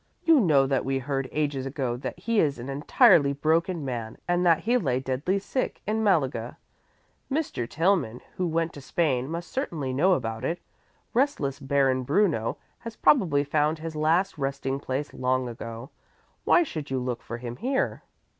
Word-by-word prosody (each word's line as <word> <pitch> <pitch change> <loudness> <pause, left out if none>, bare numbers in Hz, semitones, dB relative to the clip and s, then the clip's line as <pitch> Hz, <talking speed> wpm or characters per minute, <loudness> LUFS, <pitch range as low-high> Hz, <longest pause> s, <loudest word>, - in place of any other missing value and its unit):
"You 325 -3 +6
know 150 - +4
that 135 -1 0
we 135 0 0
heard 135 0 -2
ages 145 -3 -1
ago 135 -3 -2
that 130 +5 -6
he 220 +4 0
is 145 -6 +2
an 120 +3 -7
entirely 140 0 +4
broken 160 +2 0
man 115 -4 -4
and 175 0 +2
that 165 -1 +4
he 235 +6 +1
lay 135 - +1
deadly 135 +9 -1
sick 230 +6 -3
in 220 +2 0
Malaga. 135 - +1 0.7
Mr. 270 - -2
Tillman, 165 - +1 0.2
who 180 - -1
went 165 0 -1
to 145 - -9
Spain, 135 -3 0
must 170 +2 -5
certainly 155 - -3
know 180 +9 +4
about 115 -6 -2
it. 170 - -1 0.6
Restless 230 - 0
Baron 135 -1 +2
Bruno 145 - +1 0.2
has 230 -1 -8
probably 165 - +3
found 150 +2 +1
his 160 0 -6
last 160 +3 +1
resting 135 0 -2
place 140 +1 -4
long 130 0 0
ago. 115 +1 -7 0.5
Why 350 - +5
should 155 - -6
you 135 - -1
look 125 -1 -3
for 120 - -6
him 120 0 -7
here?" 265 +5 -1
145 Hz, 170 wpm, -26 LUFS, 130-175 Hz, 0.7 s, You